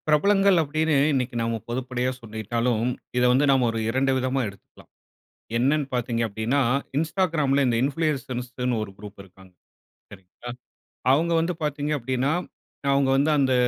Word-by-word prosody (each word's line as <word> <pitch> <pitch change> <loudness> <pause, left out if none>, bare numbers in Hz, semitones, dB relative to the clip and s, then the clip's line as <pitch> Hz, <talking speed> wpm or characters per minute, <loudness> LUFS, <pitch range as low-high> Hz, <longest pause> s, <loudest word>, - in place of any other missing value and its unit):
பிரபலங்கள் 195 +5 +4
அப்டின்னு 155 +1 0 0.2
இன்னைக்கு 125 -2 -1
நம்ம 115 0 -1
பொதுப்படையா 125 +1 -2
சொல்லிட்டாலும் 115 +1 -1 0.3
இத 125 - +3
வந்து 135 +4 +3
நம்ம 130 -2 +3
ஒரு 115 - -3
2 135 +3 +1
விதமா 130 +1 0
எடுத்துக்கலாம். 100 -2 -14 0.7
என்னன்னு 140 +4 +2
பாத்திங்க 120 -1 -1
அப்டினா, 110 +7 0 0.4
Instagramல 155 -4 +1
இந்த 120 -2 +1
இன்ஃப்ளூயசர்ஸ்ன்னு 130 -5 -2
ஒரு 105 - -10
குரூப் 100 0 -11
இருக்காங்க 95 0 -19 0.6
சரிங்களா. 95 +4 -12 0.6
அவங்க 165 +5 +2
வந்து 165 +2 0
பாத்திங்க 150 0 -2
அப்டின்னா 130 +3 -1 0.6
அவங்க 140 -1 +2
வந்து 140 +3 +2
அந்த 135 -2 +2
130 Hz, 130 wpm, -24 LUFS, 115-145 Hz, 0.7 s, பிரபலங்கள்